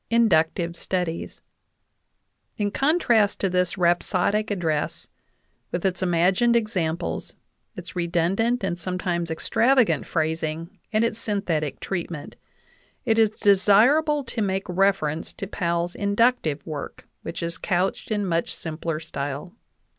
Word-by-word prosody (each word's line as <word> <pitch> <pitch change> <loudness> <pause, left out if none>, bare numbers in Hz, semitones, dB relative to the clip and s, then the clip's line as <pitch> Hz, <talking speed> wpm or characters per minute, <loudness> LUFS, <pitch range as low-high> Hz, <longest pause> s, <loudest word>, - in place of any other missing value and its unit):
INDUCTIVE 170 -7 +2
STUDIES 175 -2 -3 1.1
In 205 -1 0
contrast 245 - +2
to 195 - 0
this 180 +1 0
rhapsodic 185 +4 +2
address, 165 -7 -2 0.6
with 175 +2 -2
its 185 -1 0
imagined 185 +7 +3
ex 225 -1 -2
amples, 170 -1 -2 0.4
its 180 -2 -9
redundant 180 +8 +1
and 175 -2 -2
sometimes 175 -1 -2
extravagant 235 +9 +2
phrasing, 160 +3 -2
and 215 +1 +2
its 230 -1 -2
synthetic 170 - -2
treatment, 170 -5 -5 0.7
it 225 -2 +3
is 220 -1 +5
desirable 220 +10 +4
to 230 -2 -4
make 195 -1 -1
reference 180 -4 0
to - - -6
Powell's 170 -2 -1
inductive 200 - +1
work, 150 -2 -7
which 170 +1 -5
is 170 0 -4
couched 185 0 -1
in 210 -2 0
much 170 -2 0
simpler 160 0 -4
style. 145 +1 -5
185 Hz, 120 wpm, -24 LUFS, 170-210 Hz, 1.1 s, is